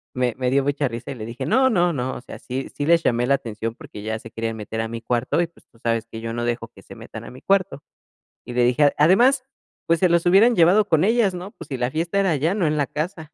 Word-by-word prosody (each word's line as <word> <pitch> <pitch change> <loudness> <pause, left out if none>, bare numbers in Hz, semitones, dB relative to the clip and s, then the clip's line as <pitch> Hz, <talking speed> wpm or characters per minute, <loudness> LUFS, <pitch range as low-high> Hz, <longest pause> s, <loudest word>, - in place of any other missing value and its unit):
Me 125 -2 0
me 125 -1 0
dio 140 +1 +3
mucha 145 0 0
risa 120 +3 -6
y - - -6
le 110 -3 -7
dije: 115 +2 -6
"No, 260 0 +3
no, 175 -6 +2
no. 130 -2 -3
O - - -8
sea, - - -10
sí 130 +1 -5
sí 145 - -2
les 170 0 +4
llamé 120 +1 +1
la 140 - +4
atención 115 -2 -5
porque 105 - -11
ya 110 +1 -2
se 115 - -12
querían 115 0 -4
meter 110 +1 -4
a 115 - -2
mi 115 0 -5
cuarto 120 +6 0
y, 170 - 0
pues, 170 - -25
tú 115 - -24
sabes 115 -1 -1
que 110 - -6
yo 115 0 -4
no 120 - -3
dejo 120 -1 -2
que - - -17
se - - -12
metan - - -10
a - - -9
mi 125 - -13
cuarto". 195 -6 0 0.6
Y 120 - -7
le 125 0 +3
dije, 125 +4 +3
"a 145 - +4
además, 240 - +4 0.4
pues, 165 0 +2
se 185 - +4
los 170 0 +2
hubieran 210 +7 +5
llevado 190 +5 +5
con 160 -1 +3
ellas, 220 -3 +2
¿no? 180 +3 -7
Pues - - -12
si 135 - -3
la 125 0 0
fiesta 170 +6 -1
era 195 -2 +2
allá, 155 +5 +1
no 195 -5 +1
en 155 0 0
la 140 - +1
casa". 155 0 -5
140 Hz, 290 wpm, -22 LUFS, 120-175 Hz, 0.6 s, hubieran